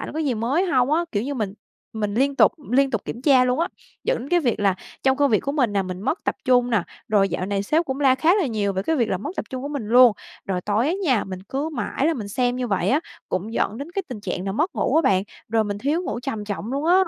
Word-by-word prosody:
ảnh - - -6
có 315 - -4
gì 285 -6 0
mới 250 - +1
hông 265 -4 +2
á, 340 +2 +2
kiểu 205 - 0
như, 280 +4 -3
mình 210 -6 -3 0.4
mình 210 -2 -2
liên 275 +4 +1
tục - - +6 0.2
liên 275 +1 +4
tục 225 -5 -2
kiểm 240 - -6
tra 265 -3 +5
luôn 250 +5 +1
á, 340 - +1 0.4
dẫn - - +1
đến 275 - -7
cái 350 +2 +3
việc 240 -7 0
là 195 -2 +3 0.3
trong 265 0 +3
công 285 -2 +3
việc 215 - +3
của 280 - -3
mình 255 -8 +1
nè, 200 -1 +1
mình 185 -1 -6
mất 320 - -2
tập - - 0
trung 245 -1 +3
nè. 220 -6 +2 0.3
Rồi 200 -2 +3
dạo 185 +1 -3
này 200 0 -1
sếp 315 +10 +1
cũng 265 -2 -4
la 265 -2 +5
khá 320 +7 +3
là 395 -6 +1
nhiều 210 -5 -1
về 190 0 -2
cái 320 +10 0
việc 235 -5 +1
là 190 - 0
mất 290 +10 -5
tập - - -2
trung 260 0 -5
của 285 - -4
mình 280 -8 -4
luôn. 245 0 +7 0.3
Rồi 185 -2 -2
tối 210 +7 0
á 330 - +1
nha, 255 -9 +2
mình 185 -1 -7
cứ 275 +9 -3
mãi 275 +1 -1
là 330 - +2
mình 215 -7 -5
xem 245 +4 0
như 255 - -2
vậy 195 -5 0
á, 285 +4 +3 0.3
cũng 185 +5 -3
dẫn 220 -2 0
đến 285 +4 -6
cái 390 - -1
tình 245 -5 -6
trạng 190 -2 -4
là 195 - -1
mất 310 - 0
ngủ - - +1
á 325 - +5
bạn, 190 -8 +3 0.3
rồi 225 0 +2
mình 205 -1 -3
thiếu 295 - 0
ngủ 240 - -4
trầm 230 -5 -4
trọng 205 +3 -4
luôn 280 +2 -2
á. 350 - +5
250 Hz, 300 wpm, -23 LUFS, 205-285 Hz, 0.4 s, luôn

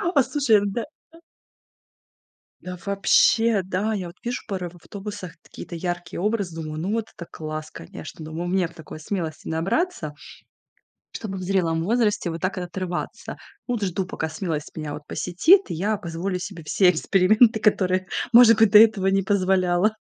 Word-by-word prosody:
Послушай, 265 -5 +3
да. 215 +4 -2 1.8
Да 180 0 -7
вообще, 200 +2 +3
да. 195 +4 -2
Я 185 -4 -4
вот 170 - -13
вижу 245 +1 -3
пары 185 -3 -3
в 175 - -17
автобусах, 200 0 -8
какие-то 170 - -9
яркие 175 0 -4
образы. 200 -5 -1
Думаю: 155 0 -5
"Ну, 195 +5 -2
вот 225 -1 -1
это 170 - -7
класс, 155 0 -6
конечно". 80 - -10
Думаю: 165 +3 -5
"Мне 185 -1 +1
б 165 - -12
такой 160 -2 -10
смелости 160 -2 -5
набраться, 165 - -1 1.0
чтобы 200 -4 -6
в - - -6
зрелом 175 -4 0
возрасте 210 -3 +1
вот 165 - -6
так 185 +1 -2
вот 180 - -4
отрываться". 180 0 -5 0.3
Ну 245 - -1
вот, 215 - -4
жду, 185 0 -1
пока 160 - -4
смелость 160 -2 -4
меня 155 -2 -5
вот 150 - -8
посетит, 320 - +4
и - - -4
я 205 +6 0
позволю 180 0 -4
себе 170 -2 -7
все 180 +4 +4
эксперименты, 215 +7 +3
которые, 185 -3 +1 0.3
может 230 -1 +8
быть, 220 -3 +5
до 210 - +9
этого 215 -3 +5
не 195 0 +2
позволяла. 185 0 +2
185 Hz, 165 wpm, -23 LUFS, 170-210 Hz, 1.8 s, до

